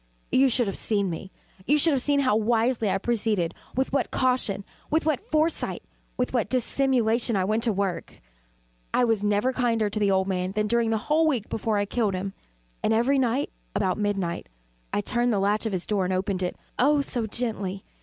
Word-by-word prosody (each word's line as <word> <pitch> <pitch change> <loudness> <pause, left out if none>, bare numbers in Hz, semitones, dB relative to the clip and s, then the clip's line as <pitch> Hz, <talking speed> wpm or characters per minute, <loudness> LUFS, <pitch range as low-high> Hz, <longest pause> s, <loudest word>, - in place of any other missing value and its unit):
But - - +3
you 270 0 +6
should 245 0 +1
have 195 - -3
seen 200 -4 0
me. 190 +3 -7 0.4
You 295 +4 +4
should 310 +1 +3
have 265 - +1
seen 285 +1 +2
how 255 -6 +3
wisely 225 0 +2
I 195 - +2
proceeded 210 -5 0 0.2
with 265 +2 0
what 275 -3 +1
caution 250 -6 0 0.2
with 315 0 +1
what 310 -5 -1
foresight 310 +2 0 0.3
with 250 0 -1
what 230 -5 +1
dissimulation 245 -2 +1
I 190 -1 +1
went 215 +3 +1
to 230 - +3
work! 195 -3 -3 0.8
I 250 - +4
was 225 -4 +2
never 210 +5 +1
kinder 230 -4 +1
to 215 - -2
the 205 -1 +2
old 190 0 +2
man 185 0 -1
than 210 0 0
during 230 +1 +1
the 225 - +2
whole 315 +2 +3
week 245 -8 0
before 220 -1 -1
I 205 - +1
killed 205 -2 0
him. 195 +1 -4 0.5
And 220 - +2
every 265 +5 +3
night, 260 +2 0 0.2
about 190 -1 0
midnight, 195 -5 -2 0.4
I - - 0
turned 240 +3 0
the 210 - +1
latch 205 +3 +1
of - - -3
his 185 -2 -1
door 205 -3 0
and 185 - -1
opened 190 0 -1
it 180 - -2 0.2
oh 285 +3 +4
so 240 -5 -3
gently! 205 -4 -3
220 Hz, 205 wpm, -26 LUFS, 200-250 Hz, 0.8 s, you